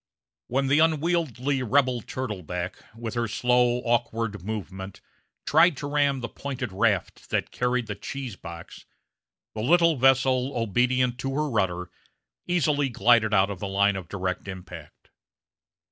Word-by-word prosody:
When 135 +3 0
the 140 +3 +3
unwieldy 155 -5 +1
rebel 125 0 +2
turtleback, 100 - -5 0.2
with 115 -1 -5
her 120 -1 -1
slow, 125 +2 +2
awkward 115 -4 -1
movement, 95 -2 -6 0.5
tried 160 0 +4
to 145 - -5
ram 145 -2 +1
the 115 - -3
pointed 130 -2 -5
raft 100 -2 0
that - - -1
carried 125 0 0
the 105 - -4
cheese 125 +2 -6
box, 85 -2 -10 0.7
the 110 - -4
little 170 +4 +4
vessel, 130 0 +3
obedient 125 +3 +1
to 135 0 -3
her 150 +1 0
rudder, 95 - -1 0.6
easily 150 -5 +1
glided 115 -2 +3
out 100 -1 +3
of 95 - -6
the 100 - -4
line 100 +1 +2
of 95 -3 -6
direct 95 -1 -3
impact. 90 -5 -10
120 Hz, 140 wpm, -26 LUFS, 100-135 Hz, 0.7 s, tried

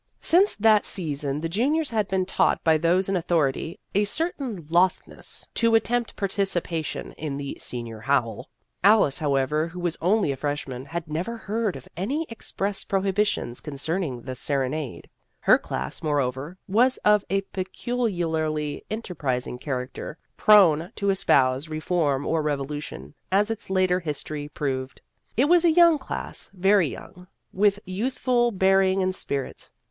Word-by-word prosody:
Since 375 +5 +4
that 215 0 +4
sea 165 -6 -1
son 140 +1 -2
the 165 - -1
juniors 275 - 0
had 215 -3 0
been 190 -1 0
taught - - +1
by 160 -1 +4
those 175 +4 +2
in 195 - 0
authority 165 -3 0
a 205 - +3
certain 255 - -3
lothness 180 +2 0
to 230 -1 +3
attempt 235 +1 +1
participation 185 -5 -2
in 150 -3 -3
the 140 -1 -5
" - - -19
Senior 115 -3 -4
Howl." 115 -2 -1 0.3
Alice, 200 -9 +5
however, 150 +1 +1
who 175 +2 -9
was 175 -2 -2
only 190 -2 +2
a - - -2
fresh 145 +2 -3
man, 130 0 -6
had 165 +2 -5
never 175 +10 -3
heard 220 -2 -2
of 135 - -10
any 265 - -2
express 205 -3 -2
pro 195 -1 0
hibitions 195 - 0
concerning 150 -2 -3
the 130 - -5
serenade. 135 +1 -2 0.3
Her - - +5
class, 65 +1 -5
moreover, 145 +1 -1
was 245 +6 +3
of 210 -1 +5
a 195 0 +1
peculiarly 170 - -2
enter 215 -3 -4
prising 125 -5 -2
character 130 +3 -5 0.2
prone 175 -6 +5
to 200 -1 +1
espouse 135 -6 +2
re 155 0 -3
form 150 -5 0
or 165 -1 +1
revolution, 145 - -4 0.2
as 205 +3 +2
its 225 -3 -6
later 185 -1 +2
history 150 -2 -5
proved. 130 -3 -3 0.4
It 260 - +4
was 345 +2 +5
a 340 - +5
young 335 -1 +6
class 265 - -5
very 190 -1 +4
young 180 +6 -10 0.3
with 200 +1 +3
youthful 240 +5 0
bearing 190 -1 +3
and 185 0 0
spirit. 140 -7 -4
175 Hz, 155 wpm, -25 LUFS, 145-205 Hz, 0.4 s, young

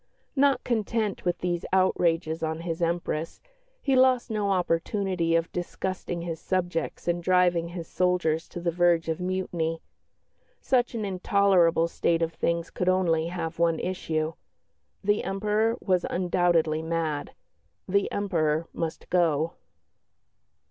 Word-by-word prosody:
Not 275 0 +3
content 220 -4 -1
with 175 0 +1
these 175 -1 -2
outrages 170 -3 +2
on 160 0 -2
his 165 -1 -4
Empress, 165 -1 -2 0.4
he 270 -2 +2
lost 255 -2 +4
no 210 -2 0
opportunity 180 -1 0
of 165 0 0
disgusting 175 -1 -4
his 165 -2 -4
subjects 175 -3 -2
and 175 0 +1
driving 175 -1 +3
his 170 -1 -7
soldiers 180 -3 0
to - - -6
the 170 0 0
verge 170 -1 +2
of 160 - -1
mutiny. 180 -3 -2 0.8
Such 245 -2 +1
an 220 -2 -2
intolerable 185 -3 +3
state 170 0 +1
of 165 0 -2
things 170 0 -1
could 180 - 0
only 170 -3 +2
have 170 -1 -4
one 165 -1 +2
issue. 160 -3 -2 0.7
The 205 +1 +2
Emperor 210 +3 0
was 185 -3 +1
undoubtedly 175 -3 +1
mad; 160 -3 -2 0.5
the 200 +1 +1
Emperor 165 -5 0
must 165 -1 -4
go. 165 -3 +2
175 Hz, 130 wpm, -27 LUFS, 165-190 Hz, 0.8 s, lost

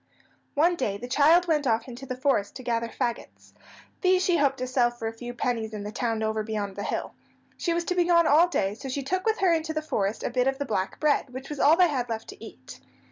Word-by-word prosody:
One 335 +5 +3
day 210 -10 -2
the 245 - -7
child 315 +7 +4
went 300 -4 +1
off 225 0 +1
into 255 +2 -9
the 255 -1 -4
forest 255 -7 0
to 255 - -8
gather 235 -1 -1
fagots. 235 0 -5 0.5
These 370 -1 +3
she 355 -2 +3
hoped 280 -2 +2
to 255 - -3
sell 250 -1 +2
for 240 -2 -6
a 225 - -4
few 240 +2 -7
pennies 230 -2 -2
in 205 - -5
the 210 - -5
town 225 -2 -2
over 220 0 0
beyond 210 -3 -4
the 205 - -5
hill. - - -3 0.4
She 345 - -2
was 340 0 0
to 360 - -1
be 355 -1 +2
gone 340 -1 +4
all 315 +4 +5
day, 205 - -1
so 265 +5 -8
she 275 +2 -3
took 370 +8 -2
with 440 - +2
her 365 -3 +4
into 320 -1 -1
the 310 - 0
forest 205 -8 -2
a - - -2
bit 250 +1 +1
of 270 0 0
the 285 - -3
black 195 -6 -2
bread, 295 -2 +1
which 260 +2 -8
was 295 -2 -6
all 305 +3 +6
they 365 -1 +6
had 255 -5 -2
left 225 -1 -5
to - - -11
eat. 130 -12 -11
255 Hz, 260 wpm, -26 LUFS, 225-315 Hz, 0.5 s, all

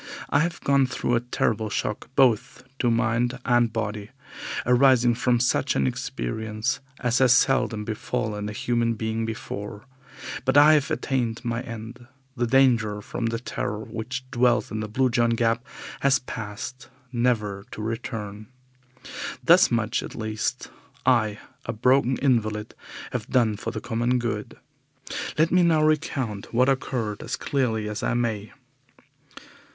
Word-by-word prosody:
I 145 - +4
have 170 +2 0
gone 140 -1 +3
through 125 -1 -2
a 120 - +4
terrible 115 -2 -1
shock 105 +1 -3
both 130 -1 +2 0.2
to 120 - +2
mind 120 +2 +1
and 120 -2 +3
body, 105 -2 -3 0.6
arising 125 -1 +5
from 125 0 +1
such 120 - +1
an 70 - +2
experience 110 - -2 0.2
as 125 0 +2
has 130 -2 +6
seldom 125 -5 +2
befallen 105 -1 -3
a - - -4
human 120 0 0
being 110 0 -2
before. 105 0 -6 0.6
But 130 +1 +2
I 150 +2 +8
have 150 -2 +2
attained 120 -3 -1
my 120 0 -1
end. 115 +1 -8 0.3
The 120 -1 0
danger 115 -5 +3
from 115 +2 -3
the 115 0 -1
Terror 110 -3 -3
which 125 +5 -5
dwells 125 -2 +2
in 110 - -3
the 110 - -3
Blue 130 +4 +1
John 120 -1 +2
Gap 115 +1 +1 0.4
has 140 -1 +4
passed 125 +2 -7 0.2
never 110 -5 0
to - - -9
return. 110 -2 -5 1.0
Thus 175 +2 +6
much 115 -1 0
at - - -8
least 110 -1 -3 0.3
I, 110 -5 +3 0.3
a - - -1
broken 130 +3 +3
invalid, 110 -5 0 0.4
have - - -3
done 115 -4 +3
for 110 - -5
the 115 - -4
common 120 +1 0
good. 115 -3 -3 0.8
Let 160 +2 +3
me 180 - +5
now 165 -3 +4
recount 135 -9 -1
what 125 +3 +3
occurred 120 -5 -1
as - - -3
clearly 115 -6 -1
as 105 0 -4
I - - 0
may. 110 -4 -1
115 Hz, 145 wpm, -25 LUFS, 110-125 Hz, 1.0 s, I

